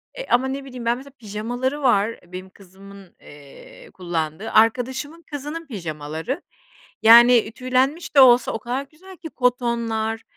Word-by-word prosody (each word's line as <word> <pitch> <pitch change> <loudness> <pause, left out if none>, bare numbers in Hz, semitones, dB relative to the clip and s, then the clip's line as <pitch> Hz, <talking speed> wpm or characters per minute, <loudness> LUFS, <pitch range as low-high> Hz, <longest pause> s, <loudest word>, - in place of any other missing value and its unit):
eee, - - -7
ama 250 +2 +2
ne 270 +1 -5
bileyim 250 -3 -9
ben 235 +1 +1
mesela 275 +2 -13
pijamaları 240 +6 -4
var 230 -4 +1
benim 185 +1 -10
kızımın, 195 0 -16
ııı, 145 -1 -15
kullandığı, 170 +2 -4
arkadaşımın 260 +8 +1
kızının 295 +3 -6
pijamaları, 160 - -5 0.6
yani, 235 0 +7
tüylenmiş 260 +7 -1
de - - +9
olsa 245 -2 +6
o - - -3
kadar 250 +5 -4
güzel 370 +4 -15
ki, 320 -1 -10
kotonlar, 235 -3 -1
240 Hz, 140 wpm, -22 LUFS, 200-265 Hz, 0.6 s, de